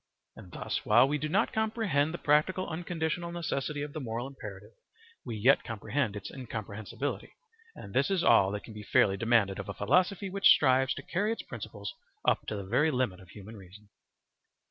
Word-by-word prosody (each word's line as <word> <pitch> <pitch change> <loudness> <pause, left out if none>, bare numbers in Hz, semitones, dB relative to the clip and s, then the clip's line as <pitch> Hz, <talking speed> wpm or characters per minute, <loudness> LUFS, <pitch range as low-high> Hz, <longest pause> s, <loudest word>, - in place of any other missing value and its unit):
And 90 - -13
thus - - -3
while 120 +5 +5
we 150 +1 -1
do 155 +2 -3
not 205 +8 +1
comprehend 215 -10 +1
the 170 - -4
practical 155 +6 +2
unconditional 170 0 -3
necessity 150 -4 -3
of 145 -1 -7
the 155 - -4
moral 120 -2 -4
imperative, 105 -7 -9 0.5
we 115 - -5
yet 125 +6 +4
comprehend 115 +1 -2
its 105 - -7
incomprehensibility, 110 +1 -5 0.4
and 100 - -10
this 130 +6 +2
is 190 -3 +1
all 95 - +5
that 105 - -4
can 110 - -11
be 105 - -8
fairly 100 -1 +3
demanded 105 -2 +2
of 100 +1 -6
a 100 - -5
philosophy 180 - +1
which 195 +1 +3
strives 130 -1 +4
to - - -7
carry 205 +5 -1
its 225 - -4
principles 105 -3 -7 0.3
up - - +2
to 110 - -3
the 100 -1 -5
very 125 +11 +2
limit 125 -10 -1
of 95 -2 -16
human 105 +3 -11
reason. 100 +1 -14
130 Hz, 190 wpm, -30 LUFS, 105-160 Hz, 0.5 s, while